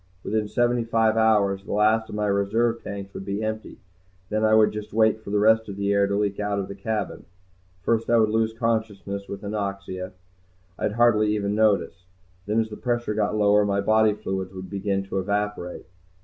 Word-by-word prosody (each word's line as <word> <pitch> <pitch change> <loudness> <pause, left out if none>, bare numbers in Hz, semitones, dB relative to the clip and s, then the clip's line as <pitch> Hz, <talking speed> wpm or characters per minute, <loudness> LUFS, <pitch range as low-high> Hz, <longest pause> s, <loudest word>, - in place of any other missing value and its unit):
Within 110 0 -1
seventy 120 +1 +1
five 115 -1 +2
hours 105 -3 +2
the - - -5
last 110 +2 +2
of - - -6
my 105 0 -1
reserve 110 +4 +1
tanks 100 -1 -7
would - - -6
be 100 +2 -3
empty. 110 0 -4 0.5
Then 110 +1 0
I 110 0 +5
would 110 -1 +5
just 105 0 -7
wait 110 0 +3
for - - -8
the 105 - +1
rest 110 +1 +3
of 100 - -6
the 100 0 0
air 100 0 +3
to 100 - -1
leak 100 -1 -1
out 105 -1 -1
of 100 -1 -2
the - - -7
cabin. 105 +1 -4 0.6
First 115 +1 0
I 120 - +5
would 110 -1 +3
lose 110 0 +1
consciousness 110 -4 -2
with 100 0 -7
anoxia. 100 -2 -4 0.7
I'd 105 - -1
hardly 110 -2 +3
even 100 -1 -1
notice. 100 -4 +1 0.4
Then 105 +2 +1
as 110 -1 -1
the 105 - -7
pressure 120 -3 -1
got 105 0 0
lower 105 0 +4
my 100 -1 0
body 110 +1 +3
fluids 95 -3 -4
would 95 0 -8
begin 100 0 -1
to 95 0 -3
evaporate. 100 -2 -3
105 Hz, 200 wpm, -24 LUFS, 100-110 Hz, 0.7 s, I